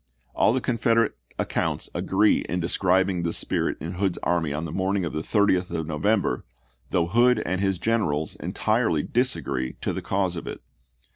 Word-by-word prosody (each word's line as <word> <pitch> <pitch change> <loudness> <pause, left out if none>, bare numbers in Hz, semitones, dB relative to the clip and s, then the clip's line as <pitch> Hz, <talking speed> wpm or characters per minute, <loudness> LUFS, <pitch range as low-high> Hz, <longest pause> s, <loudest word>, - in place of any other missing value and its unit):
All - - +3
the 130 +2 0
Confederate 115 -2 +2 0.2
accounts - - -1
agree - - +3
in 90 - -1
describing 95 +1 +2
this 85 -1 -1
spirit - - -1
in 85 - -5
Hood's 95 -3 +1
army 85 -4 +1
on 75 +3 -3
the 80 - -5
morning 95 +1 0
of 80 - -4
the 75 - -2
30th 95 -1 +2
of 80 - -3
November, 95 +7 0 0.5
though 85 - +2
Hood 120 +6 +4
and 95 +1 -1
his 95 -2 +1
generals 85 -8 0
entirely 110 -9 0
disagree 70 - -1
as - - -13
to - - -1
the - - -4
cause 95 -2 0
of 85 - -6
it. - - -6
95 Hz, 180 wpm, -25 LUFS, 85-110 Hz, 0.5 s, Hood